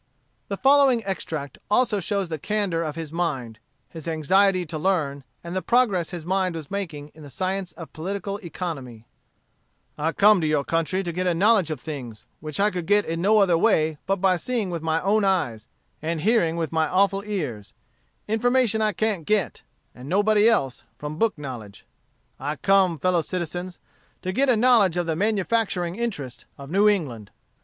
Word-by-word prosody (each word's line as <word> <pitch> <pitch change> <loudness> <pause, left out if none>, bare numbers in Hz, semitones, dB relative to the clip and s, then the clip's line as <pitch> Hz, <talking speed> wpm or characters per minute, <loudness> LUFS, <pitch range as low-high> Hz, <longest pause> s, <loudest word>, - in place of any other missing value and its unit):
The 200 - -4
following 270 -4 +4
extract 155 -7 -4
also 215 -1 +2
shows 195 0 -1
the 160 -2 -5
candor 200 -2 -1
of 155 -2 -3
his 160 -2 -6
mind, 130 -10 -3 0.3
his 160 -1 -10
anxiety 185 +4 +2
to 155 0 -5
learn, 150 -6 0 0.2
and 170 +1 -6
the 185 - 0
progress 210 -9 +2
his 175 -4 -7
mind 185 -1 0
was 160 -1 -8
making 165 -8 -4
in 155 - -17
the 145 - -10
science 185 +3 -3
of 165 - -11
political 195 +4 -4
economy: 145 - -6 0.9
"I 160 +2 +1
come 210 -2 +5
to 155 - 0
your 150 -2 +1
country 165 +5 -1
to 175 - -3
get 180 +2 -2
a 175 - +2
knowledge 200 -1 +3
of 155 -4 -4
things, 125 -7 -8
which 155 +1 -5
I 205 +1 +3
could 180 -2 -4
get 205 +1 +4
in 165 +1 -3
no 210 +4 +4
other 190 -5 +4
way 155 -7 +2
but 195 - +2
by 190 -1 +2
seeing 220 0 -2
with 170 -2 -3
my 160 0 0
own 210 +2 +2
eyes, 150 - 0 0.3
and 160 0 -2
hearing 195 -6 +2
with 165 -3 -2
my 160 -1 +1
awful 195 +3 +2
ears 150 - -4 0.6
information 225 0 +2
I 215 -1 +1
can't 210 -3 -1
get, 200 -2 0 0.3
and 125 +3 -10
nobody 210 +3 +4
else, 135 - 0
from 150 +2 -6
book 225 -6 +1
knowledge. 125 -8 -8 0.5
I 145 +3 -3
come, 190 0 +3
fellow 180 +2 +1
citizens, 175 +1 -5 0.5
to 185 - -2
get 270 +7 +1
a 250 - +5
knowledge 220 -6 +4
of 175 - 0
the 165 -1 -1
manufacturing 200 -2 0
interest 195 - -4
of 140 +1 -10
New 205 +3 +5
England. 130 - -2
180 Hz, 180 wpm, -24 LUFS, 155-200 Hz, 0.9 s, come